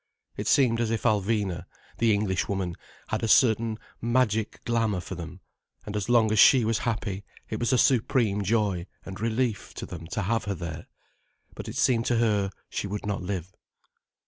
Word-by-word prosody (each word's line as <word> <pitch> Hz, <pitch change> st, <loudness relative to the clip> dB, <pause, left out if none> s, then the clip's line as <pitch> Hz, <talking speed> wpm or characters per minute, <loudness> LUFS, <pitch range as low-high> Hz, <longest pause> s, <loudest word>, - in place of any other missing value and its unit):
It -, -, -4 dB
seemed 120 Hz, -4 st, +4 dB
as 115 Hz, -, 0 dB
if 115 Hz, 0 st, -1 dB
Alvina, 100 Hz, -5 st, 0 dB, 0.3 s
the 115 Hz, -1 st, +4 dB
Englishwoman, 95 Hz, -3 st, 0 dB, 0.3 s
had -, -, -1 dB
a 115 Hz, -, 0 dB
certain 110 Hz, -1 st, +4 dB, 0.2 s
magic 115 Hz, -2 st, +1 dB
glamour 115 Hz, -5 st, +1 dB
for 90 Hz, -, -7 dB
them, 85 Hz, +1 st, -8 dB, 0.4 s
and 105 Hz, -, -6 dB
so 110 Hz, -, -2 dB
long 115 Hz, -3 st, +4 dB
as 110 Hz, -, +2 dB
she 125 Hz, +1 st, +7 dB
was 115 Hz, 0 st, +1 dB
happy, 105 Hz, -4 st, -2 dB, 0.3 s
it 110 Hz, -, -2 dB
was 120 Hz, -, 0 dB
a 130 Hz, -, +4 dB
supreme 115 Hz, -5 st, +2 dB
joy 100 Hz, -3 st, 0 dB, 0.2 s
and 95 Hz, +1 st, -8 dB
relief 115 Hz, 0 st, -1 dB
to -, -, -5 dB
them 85 Hz, -2 st, -8 dB
to 105 Hz, +4 st, -3 dB
have 115 Hz, +4 st, 0 dB
her 100 Hz, -1 st, -2 dB
there. 85 Hz, -3 st, -6 dB, 0.7 s
But -, -, -8 dB
it -, -, -6 dB
seemed 115 Hz, -3 st, +2 dB
to 120 Hz, -, +2 dB
her 105 Hz, -4 st, +2 dB, 0.2 s
she -, -, -3 dB
would 105 Hz, +1 st, -5 dB
not 105 Hz, -2 st, -2 dB
live. 90 Hz, -1 st, -4 dB
105 Hz, 180 wpm, -27 LUFS, 95-115 Hz, 0.7 s, she